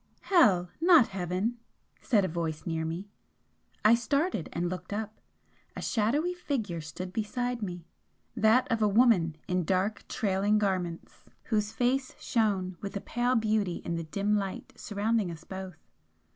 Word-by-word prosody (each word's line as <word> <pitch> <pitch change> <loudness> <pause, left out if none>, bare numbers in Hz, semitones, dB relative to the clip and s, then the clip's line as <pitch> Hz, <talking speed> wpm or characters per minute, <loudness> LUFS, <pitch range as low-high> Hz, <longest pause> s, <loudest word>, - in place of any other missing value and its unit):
"Hell 190 - +4
not 335 -8 +6
heaven!" 190 +5 -2 0.4
said 210 -7 +3
a - - 0
voice 160 -2 -3
near 165 -1 -1
me. 165 +5 -4 0.8
I 215 - +8
started 245 - 0
and 175 +1 -1
looked 180 +1 -6
up 215 +1 -4 0.6
a - - -5
shadowy 280 +11 +1
figure 230 - -3
stood 180 +4 -7
beside 245 +2 -2
me 175 -4 -5 0.5
that 225 +3 +4
of 230 -1 +1
a 210 - +5
woman 200 -7 +4
in 180 0 +1
dark 190 +5 0
trailing 205 +1 +1
garments, 185 -5 -2 0.2
whose 210 -2 0
face 255 +3 0
shone 195 -6 0
with 200 0 -4
a - - -5
pale 245 +1 0
beauty 215 -5 +1
in 170 - -2
the 165 0 -2
dim 200 +6 0
light 195 -2 -3
surrounding 210 -1 -1
us 165 -2 -8
both. 190 -1 -7
205 Hz, 150 wpm, -29 LUFS, 180-230 Hz, 0.8 s, I